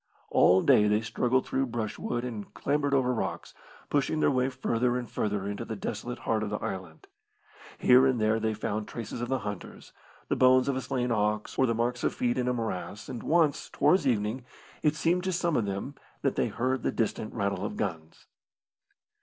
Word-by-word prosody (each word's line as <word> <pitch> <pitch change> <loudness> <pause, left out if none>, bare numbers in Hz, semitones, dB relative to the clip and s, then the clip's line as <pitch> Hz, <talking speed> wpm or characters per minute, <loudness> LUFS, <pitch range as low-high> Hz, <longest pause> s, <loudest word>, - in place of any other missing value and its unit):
All 95 +1 +5
day 105 - +5
they 105 +1 +2
struggled 125 +3 0
through 135 0 0
brushwood 120 +1 -3
and 110 -5 -6
clambered 145 0 +1
over 125 -2 +2
rocks, 115 - -4 0.4
pushing 145 +2 +1
their - - +3
way 130 0 +1
further 125 -1 0
and 125 -1 -4
further 105 -3 -2
into 100 0 -4
the 110 - -5
desolate 110 +4 -4
heart 110 -1 +1
of 110 - -2
the 105 - -2
island. 95 -6 -6 0.7
Here 130 +2 +6
and 130 -3 +1
there 110 +1 +2
they 110 -1 -1
found 105 0 -3
traces 115 0 -6
of 120 - -3
the 130 - +1
hunters, 100 -3 -7 0.3
the - - +1
bones 130 0 +5
of 140 - +1
a 130 - -2
slain 125 -1 -1
ox, 105 -1 0
or 130 - +3
the 115 - +1
marks 120 +2 -1
of - - 0
feet 120 0 0
in 125 - 0
a 125 - +2
morass, 105 -3 -4
and 120 - -5
once, 160 -3 +2
towards 145 +1 +3
evening, 115 +1 0 0.4
it 150 -1 +2
seemed 170 +4 +1
to 190 - 0
some 170 -2 0
of 115 - +1
them 100 +8 -4 0.3
that - - +1
they - - +1
heard 130 +1 -1
the - - 0
distant 110 -1 -2
rattle 100 -3 -1
of - - -4
guns. 80 0 -5
120 Hz, 200 wpm, -28 LUFS, 105-130 Hz, 0.7 s, Here